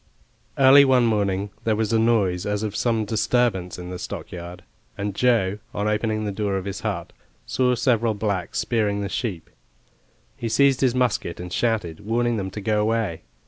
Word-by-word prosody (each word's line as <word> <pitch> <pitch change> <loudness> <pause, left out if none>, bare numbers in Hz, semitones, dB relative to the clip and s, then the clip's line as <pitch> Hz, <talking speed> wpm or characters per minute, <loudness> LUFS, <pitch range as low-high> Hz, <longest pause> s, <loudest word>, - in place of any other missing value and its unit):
Early 135 +1 +8
one 130 -3 +4
morning 100 -3 0
there 110 -1 +1
was 110 +1 -1
a 110 - +4
noise 105 -6 +2
as 105 +1 -1
of 105 -1 -3
some 115 -3 0
disturbance 110 -4 0
in 90 0 -7
the 90 - -6
stockyard, 90 0 -7 0.3
and 100 0 -3
Joe, 105 -3 +2 0.2
on 100 +1 -1
opening 110 0 0
the 105 - -2
door 100 -1 -1
of 95 - -5
his 100 0 -4
hut, 100 -6 -4 0.3
saw 125 -1 +1
several 115 -2 +1
blacks 100 -4 -2
spearing 105 -4 0
the 100 - -3
sheep. 95 -5 -3 0.9
He 115 - -4
seized 135 +3 +3
his 130 -2 +2
musket 125 -9 0
and 90 0 -7
shouted, 105 -7 -1
warning 120 +2 0
them 95 -2 -3
to 105 +3 -7
go 105 +1 +1
away. 110 -6 -1
105 Hz, 180 wpm, -23 LUFS, 95-115 Hz, 0.9 s, Early